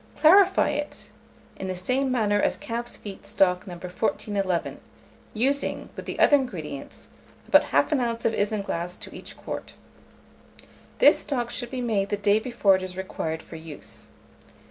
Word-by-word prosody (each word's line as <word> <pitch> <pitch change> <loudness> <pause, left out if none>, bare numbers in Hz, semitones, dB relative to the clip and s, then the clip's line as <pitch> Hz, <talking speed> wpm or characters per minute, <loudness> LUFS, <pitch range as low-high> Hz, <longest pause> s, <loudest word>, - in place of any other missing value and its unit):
Clarify 380 +4 +6
it 295 0 -5 0.5
in 190 - -5
the 185 - -2
same 255 +9 0
manner 205 -4 +2
as - - +1
calf's 240 +1 -5
feet 200 -2 -9
stock 180 +1 +2
No. 180 - -6
1411, 185 +1 -2 0.6
using, 275 +6 0
with - - -7
the - - -4
other 290 - +6
ingredients, 165 - -6 0.4
about - - +6
1/2 295 -5 +2
oz. 230 - -12
of 225 - +3
isinglass 200 -5 -2
to - - -9
each - - -9
quart. - - -6 1.2
This - - +6
stock 240 -4 -2
should 240 -1 -4
be 255 0 -4
made 205 -5 0
the 205 - 0
day 205 +1 +3
before 220 -5 +3
it - - -7
is 185 0 -7
required 160 -4 -4
for 165 - -10
use. 160 -2 -10
205 Hz, 155 wpm, -26 LUFS, 185-250 Hz, 1.2 s, Clarify